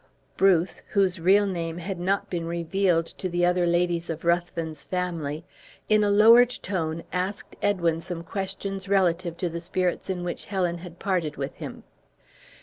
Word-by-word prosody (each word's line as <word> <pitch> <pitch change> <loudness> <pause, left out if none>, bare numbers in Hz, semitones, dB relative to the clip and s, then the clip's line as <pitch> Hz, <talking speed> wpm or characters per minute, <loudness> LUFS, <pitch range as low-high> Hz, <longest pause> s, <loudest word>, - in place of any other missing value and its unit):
Bruce, 185 -2 +3
whose 190 -3 +2
real 195 +4 +5
name 170 -4 -3
had 180 +1 -5
not 195 +3 0
been 170 -2 -3
revealed 170 0 +1
to 185 - -5
the 175 0 +1
other 180 0 +2
ladies 175 0 +1
of 165 0 -5
Ruthven's 170 -3 -1
family, 170 -4 -3 0.4
in 215 -1 +5
a 205 - +2
lowered 230 +4 +7
tone, 165 -4 -2
asked 185 +3 -3
Edwin 170 -5 +1
some 170 -1 -6
questions 195 +1 -4
relative 175 -3 +1
to 180 - -1
the 170 0 -5
spirits 180 +1 -1
in 180 -2 -2
which 175 - -4
Helen 180 -3 -1
had 175 -1 -10
parted 175 -6 -1
with 135 -1 -3
him. - - -8
175 Hz, 160 wpm, -26 LUFS, 170-195 Hz, 0.4 s, lowered